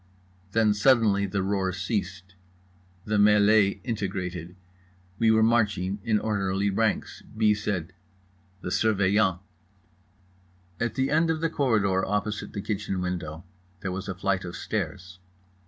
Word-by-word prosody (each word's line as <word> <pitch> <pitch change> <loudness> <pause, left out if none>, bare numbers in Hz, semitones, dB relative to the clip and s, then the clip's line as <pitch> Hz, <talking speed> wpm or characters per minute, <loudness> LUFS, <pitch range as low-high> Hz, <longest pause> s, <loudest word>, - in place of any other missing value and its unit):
Then 110 -2 +3
suddenly 105 -3 +3
the 100 -1 -2
roar 95 -1 0
ceased. 95 -1 -4 0.7
The 105 0 0
mêlée 105 0 +4
integrated. 95 -6 -4 0.6
We 115 - +4
were 110 0 +4
marching 105 -4 +1
in 110 -2 +2
orderly 100 -2 0
ranks. 110 +2 -1 0.2
B. 110 -1 +4
said: 95 -4 -3 0.7
"The 90 - -5
Surveillant!" 100 -3 +2 1.4
At 115 - -1
the 135 0 0
end 160 +2 +3
of 160 -1 0
the 165 0 -1
corridor, 105 -10 +1
opposite 105 +1 -2
the 100 - -4
kitchen 105 -3 -2
window, 85 -3 -4 0.4
there 95 - -3
was 95 +2 -5
a 95 - -3
flight 95 0 -1
of 85 -1 -7
stairs. 90 -1 -4
100 Hz, 130 wpm, -26 LUFS, 95-110 Hz, 1.4 s, mêlée